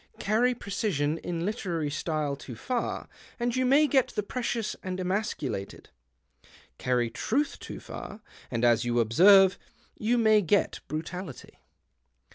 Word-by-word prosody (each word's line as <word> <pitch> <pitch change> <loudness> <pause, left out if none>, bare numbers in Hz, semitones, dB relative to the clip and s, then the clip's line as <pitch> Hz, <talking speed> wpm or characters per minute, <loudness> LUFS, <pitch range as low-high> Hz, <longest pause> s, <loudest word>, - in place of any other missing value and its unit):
Carry 240 +5 +2
precision 175 - -1
in 170 -1 -3
literary 175 -8 -2
style 155 -2 -2
too 130 -3 -9
far, 245 - -3 0.3
and 240 0 0
you 255 0 +1
may 285 +4 +5
get 270 -4 +3
the 210 - -3
precious 230 0 -2
and 185 0 -4
emasculated. 185 - -3 0.9
Carry 120 -2 0
truth 270 - -1
too - - -8
far, 210 +2 -9 0.3
and, 120 -1 0
as 120 -1 +4
you 120 0 +1
observe, 185 - +6 0.4
you 235 +3 +1
may 220 -2 +5
get 200 +2 +1
brutality. 160 0 -6
185 Hz, 130 wpm, -28 LUFS, 145-225 Hz, 0.9 s, observe